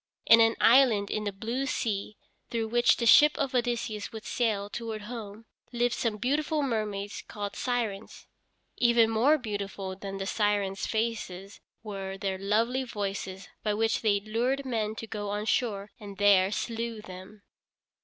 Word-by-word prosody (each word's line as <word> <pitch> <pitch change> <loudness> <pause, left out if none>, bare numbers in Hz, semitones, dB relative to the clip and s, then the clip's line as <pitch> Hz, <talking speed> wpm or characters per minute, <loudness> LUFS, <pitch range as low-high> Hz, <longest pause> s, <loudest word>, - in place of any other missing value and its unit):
In 230 0 +8
an 225 0 +4
island 230 -5 +5
in 215 0 -2
the 205 - -1
blue 230 +7 -3
sea 210 -4 -2 0.3
through 225 -2 -2
which 240 +1 +4
the 235 - -1
ship 300 +6 +7
of 265 - -1
Odysseus 235 -4 -1
would 220 -1 -8
sail 215 -4 0
toward 220 -1 -5
home, 220 -1 -8 0.3
lived 240 0 +1
some 225 -3 -1
beautiful 295 +5 0
mermaids 210 -5 -3
called 205 -1 -5
Sirens. 225 -5 -3 0.5
Even 235 -2 +4
more 255 +8 +4
beautiful 200 -5 -5
than 195 0 -6
the 195 - -4
Sirens' 205 -2 0
faces 215 -4 -3 0.2
were 195 -2 -5
their 190 -1 -3
lovely 225 +6 +1
voices 195 -4 -5
by 210 -1 0
which 225 +1 +1
they 205 -2 +2
lured 245 +6 -1
men 220 -4 -2
to 225 - -6
go 205 -2 -5
on 205 +1 -2
shore 210 -4 -1
and 200 -2 -9
there 200 -2 +5
slew 230 0 -3
them. 190 +3 -11
215 Hz, 155 wpm, -28 LUFS, 200-235 Hz, 0.5 s, In